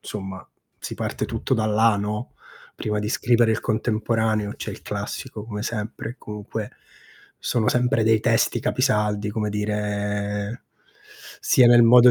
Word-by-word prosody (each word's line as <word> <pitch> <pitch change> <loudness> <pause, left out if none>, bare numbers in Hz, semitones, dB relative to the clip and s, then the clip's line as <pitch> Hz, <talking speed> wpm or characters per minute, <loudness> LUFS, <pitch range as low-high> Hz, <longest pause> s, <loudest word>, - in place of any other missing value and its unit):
somma 95 -2 -7 0.3
si - - -6
parte - - -3
tutto - - -3
da 110 -1 0
là, 110 0 +4
no, 105 +3 -3 0.4
prima 105 -1 -2
di 105 0 -2
scrivere 120 -1 +3
il 110 - -1
contemporaneo 110 -1 0
c'è - - -5
il - - -9
classico 105 - -5
come 105 -2 -5
sempre 115 0 -4
e - - -9
comunque 105 0 -6 0.7
sono 115 -3 0
sempre 125 -1 +2
dei 110 -1 +4
testi 115 +1 +2
capisaldi 105 -5 +1
come 105 0 -2
dire 105 +1 -2 0.8
sia 130 -6 +5
nel 120 0 +8
modo 125 +1 +8
110 Hz, 145 wpm, -23 LUFS, 105-115 Hz, 0.8 s, nel